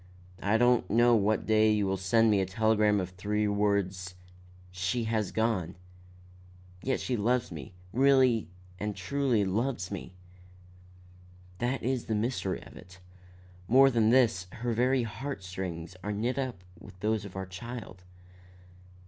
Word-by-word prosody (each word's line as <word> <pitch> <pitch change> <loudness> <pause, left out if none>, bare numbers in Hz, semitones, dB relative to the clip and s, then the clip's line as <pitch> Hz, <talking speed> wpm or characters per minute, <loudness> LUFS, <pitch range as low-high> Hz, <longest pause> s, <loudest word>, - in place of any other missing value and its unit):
I 105 +2 +2
don't 120 0 +3
know 120 +2 +5
what 105 0 +1
day 110 0 +4
you 105 -1 +1
will 95 0 0
send 110 +4 +3
me 100 -2 +3
a - - 0
telegram 105 +1 +2
of 90 -1 -4
three 105 +3 -1
words, 100 -3 0 0.6
'She 95 +6 -1
has 110 -3 -1
gone.' 110 -6 -1 1.1
Yet 130 - -1
she 125 - -2
loves 120 +1 0
me, 80 +2 -9 0.2
really 130 - +4 0.3
and 105 0 -3
truly 115 +2 0
loves 105 0 -2
me. 95 -2 -7 1.4
That 125 +2 -1
is 130 0 -1
the 110 - -1
mystery 105 -4 -2
of - - -14
it. 90 +1 -14 0.7
More 135 +3 +6
than 115 -3 +3
this, 115 -7 +3
her 120 +1 -2
very 125 +2 +2
heart 115 0 -5
strings 90 -2 -6
are 105 - -2
knit 115 +6 -1
up 125 -9 -4 0.2
with 90 - -14
those 110 0 0
of 100 -2 -10
our 95 0 -4
child." 95 0 -8
105 Hz, 150 wpm, -29 LUFS, 95-120 Hz, 1.4 s, More